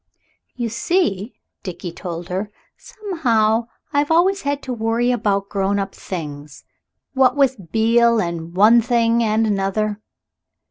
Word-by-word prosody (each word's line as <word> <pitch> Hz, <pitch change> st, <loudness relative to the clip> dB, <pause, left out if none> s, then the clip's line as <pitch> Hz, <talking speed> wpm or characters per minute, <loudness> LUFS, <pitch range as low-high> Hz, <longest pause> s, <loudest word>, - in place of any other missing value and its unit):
"You 240 Hz, -2 st, -2 dB
see," 230 Hz, -, -1 dB, 0.3 s
Dickie 180 Hz, -2 st, -6 dB
told 170 Hz, 0 st, -7 dB
her, 190 Hz, +3 st, -3 dB, 0.3 s
"somehow 245 Hz, -, 0 dB, 0.3 s
I've 290 Hz, 0 st, +1 dB
always 370 Hz, +5 st, +3 dB
had 285 Hz, 0 st, -2 dB
to 255 Hz, -, -4 dB
worry 230 Hz, +1 st, 0 dB
about 205 Hz, -4 st, 0 dB
grown 200 Hz, 0 st, -1 dB
up 195 Hz, -1 st, -3 dB
things. 150 Hz, -5 st, -7 dB, 0.5 s
What 260 Hz, -2 st, +3 dB
with 250 Hz, -, 0 dB
Beale, 230 Hz, +1 st, +3 dB
and 170 Hz, -2 st, -4 dB
one 220 Hz, +5 st, +6 dB
thing 235 Hz, 0 st, +2 dB
and 220 Hz, 0 st, +2 dB
another." 205 Hz, +1 st, -1 dB
220 Hz, 130 wpm, -20 LUFS, 195-245 Hz, 0.5 s, one